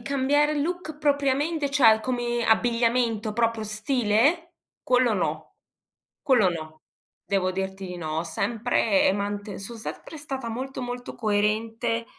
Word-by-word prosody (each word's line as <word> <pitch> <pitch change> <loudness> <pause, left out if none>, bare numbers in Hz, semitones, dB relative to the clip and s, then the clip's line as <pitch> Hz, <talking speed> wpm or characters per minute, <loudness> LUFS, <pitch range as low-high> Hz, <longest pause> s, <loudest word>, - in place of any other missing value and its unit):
cambiare 280 +4 +1
look 335 -1 -3
propriamente 285 +1 +1
cioè 225 -6 +6
come 240 0 -1
abbigliamento, 230 -1 +1
proprio 230 0 0
stile? 245 +9 +1 0.3
Quello 250 -2 +3
no, 195 - -3 0.7
quello 230 -9 +4
no, 155 -2 -7 0.4
devo 190 -2 0
dirti 190 +1 -4
di 180 - -6
no, 155 -2 -4
ho 165 - 0
sempre, 220 +3 +1
ehm, 190 - +2
mante 205 -1 -4
son 230 +4 -8
sempre 270 +7 -8
stata 270 -5 -5
molto, 260 +3 -5
molto 245 0 -6
coerente 220 +2 0
230 Hz, 130 wpm, -25 LUFS, 205-265 Hz, 0.7 s, cioè